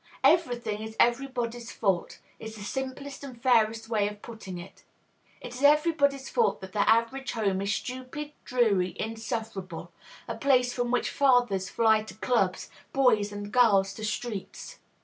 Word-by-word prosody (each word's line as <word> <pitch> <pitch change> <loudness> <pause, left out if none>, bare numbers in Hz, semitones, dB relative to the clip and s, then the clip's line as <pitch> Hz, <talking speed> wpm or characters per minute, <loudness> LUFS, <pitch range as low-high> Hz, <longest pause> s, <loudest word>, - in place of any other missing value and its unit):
Every 330 -8 +4
thing 215 -3 -4
is 220 0 -7
everybody's 240 -2 0
fault 190 -5 -1 0.2
is 220 0 -8
the 210 - -9
simplest 265 +5 -5
and 255 -4 -9
fairest 225 -2 +2
way 215 -3 +1
of 210 0 -8
putting 210 -6 -8
it. 175 +3 -12 0.6
It - - -8
is 250 - -8
everybody's 285 -2 +3
fault 470 -2 +1
that 190 0 -9
the 205 -2 +2
average 230 +4 +1
home 200 -4 0
is 200 +1 -1
stupid, 260 +7 -5
dreary, 205 -8 +1
insufferable, 220 -6 -5 0.4
a 230 - -3
place 250 0 +2
from 245 -1 -1
which 245 - 0
fathers 245 -9 +2
fly 220 -2 +3
to - - -10
clubs, 215 -6 0 0.2
boys 220 -6 +3
and 205 0 -6
girls 205 -6 +4
to 220 - -9
streets. 210 -2 -5
230 Hz, 155 wpm, -28 LUFS, 205-255 Hz, 0.6 s, Every